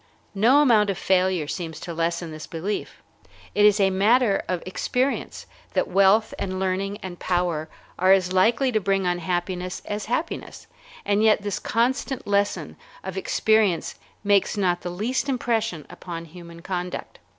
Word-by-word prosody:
No 245 +9 +5
amount 215 -6 +4
of 195 - -1
failure 185 -4 +1
seems 160 -1 -5
to 170 - -6
lessen 170 0 -2
this 155 0 -8
belief. 185 +6 -5 0.5
It 210 - +4
is 210 0 +5
matter 200 +3 +3
of 180 -2 -2
experience 250 +8 -2 0.3
that - - +2
wealth 200 +4 +3
and 185 -1 -3
learning 190 +2 -1
and 180 -2 -7
power 175 -4 -1 0.3
are 185 +1 +4
as 185 -1 +3
likely 235 +8 +3
to 220 - +2
bring 195 -1 0
unhappiness 180 +1 -2
as 210 0 -4
happiness, 250 +9 -4 0.4
and 205 +1 +2
yet 215 -1 +4
this 205 -2 -2
constant 255 +3 -1
lesson 205 0 -1 0.3
of - - -6
experience 220 - +1 0.3
makes 200 0 +2
not 180 -3 +1
the 175 - -4
least 230 +10 -2
impression 225 - -1
upon 170 -2 -8
human 170 0 -12
conduct. 180 -1 -5
195 Hz, 150 wpm, -24 LUFS, 180-215 Hz, 0.5 s, No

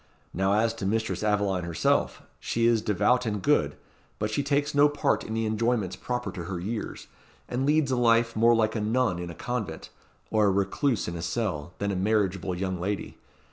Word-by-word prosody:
Now, 95 +2 +1
as 110 +2 +2
to 105 -4 -4
Mistress 110 +2 -1
Aveline 105 -3 +1
herself, 85 -2 0 0.2
she 115 0 0
is 115 -2 +4
devout 105 +4 +2
and 105 -1 -1
good; 95 - +2 0.4
but 105 0 -2
she 110 - 0
takes 145 +1 0
no 145 +1 +5
part 145 0 0
in 110 - -5
the 115 0 0
enjoyments 110 -3 0
proper 125 0 -3
to 90 -4 -6
her 90 0 -4
years, 105 +5 -5 0.4
and 130 +3 -1
leads 150 -2 +3
a - - +2
life 115 -1 +3
more 115 +2 +5
like 110 0 +1
a 110 - -1
nun 110 -3 +1
in 90 -1 -5
a 85 - -8
convent, 110 -8 -4 0.4
or 110 -2 +3
a - - +4
recluse 100 - 0
in 85 - -4
a 85 - -5
cell, 85 -6 -2
than 100 0 -1
a - - -2
marriageable 95 -2 0
young 95 0 -3
lady. 100 +3 -3
110 Hz, 200 wpm, -27 LUFS, 95-120 Hz, 0.4 s, no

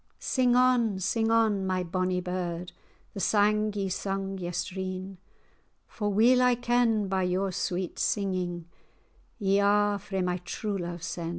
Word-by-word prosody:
Sing 250 -2 +1
on, 250 -5 +3
sing 225 +4 0
on, 220 -4 +2
my 185 -1 0
bonny 185 +1 -1
bird, 180 -1 -4 0.4
The - - -6
sang 210 +1 +2
ye 200 -1 -1
sung 195 +1 -3
yestreen, 185 +1 -4 0.7
For 210 -2 -3
weel 240 +5 +5
I 250 -1 +4
ken, 240 -3 +1
by 190 0 0
your 185 +1 0
sweet 180 0 -3
singing 180 -4 -1 0.7
Ye 200 -3 +2
are 205 0 +3
frae 195 -1 -3
my 180 0 0
true 200 +3 -4
love 175 -1 -5
sen." 170 0 -4
195 Hz, 140 wpm, -28 LUFS, 185-215 Hz, 0.7 s, weel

